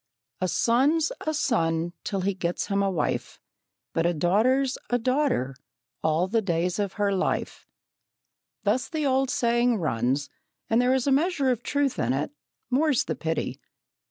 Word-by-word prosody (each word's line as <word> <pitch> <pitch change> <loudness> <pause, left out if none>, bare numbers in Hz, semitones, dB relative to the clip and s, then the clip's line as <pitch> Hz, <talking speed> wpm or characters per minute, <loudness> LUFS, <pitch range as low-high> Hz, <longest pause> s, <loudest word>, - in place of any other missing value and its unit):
"A 185 - 0
son's 280 - +2 0.2
a - - +3
son 170 - 0
till 195 -2 -2
he 200 +2 0
gets 180 -2 -2
him 200 0 +1
a 195 - +2
wife, 180 -5 -2 0.5
But 165 +1 +2
a 175 - 0
daughter's 245 - +2
a 245 - +2
daughter 255 - 0 0.5
all 160 +3 +1
the 225 +3 +1
days 175 -1 -1
of 200 -2 -1
her 205 -1 0
life." 190 - -2 1.0
Thus 255 - +1
the 310 -3 -2
old 265 -1 +2
saying 240 -1 +2
runs, 135 - 0 0.4
and 225 +2 +4
there 250 +1 +3
is 260 - 0
a 280 - +2
measure 285 -1 +2
of 240 -2 -1
truth 285 0 0
in 125 +2 +1
it, 145 - -2 0.4
more's 285 0 +3
the - - -2
pity. 160 -1 -3
220 Hz, 160 wpm, -26 LUFS, 170-265 Hz, 1.0 s, and